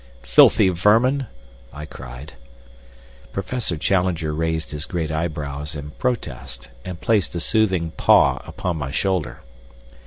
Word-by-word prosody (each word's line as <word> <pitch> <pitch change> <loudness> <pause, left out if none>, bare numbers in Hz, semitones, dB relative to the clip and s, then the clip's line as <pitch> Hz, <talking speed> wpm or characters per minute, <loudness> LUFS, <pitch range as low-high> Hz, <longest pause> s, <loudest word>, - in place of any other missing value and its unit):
"Filthy - - +6
vermin!" 115 +9 +3 0.4
I 75 +2 -8
cried. 65 +1 -10 1.0
Professor 100 -2 -2
Challenger 85 -2 0
raised 80 0 -2
his 75 +3 -4
great 80 -4 -2
eyebrows 75 -2 -3
in 75 0 -7
protest, 65 - -4
and 90 -2 -7
placed 105 -5 +1
a - - -1
soothing 95 -3 +1
paw - - +4
upon 90 -3 -3
my 65 -3 -4
shoulder. 75 -5 -1
80 Hz, 120 wpm, -22 LUFS, 75-95 Hz, 1.0 s, Filthy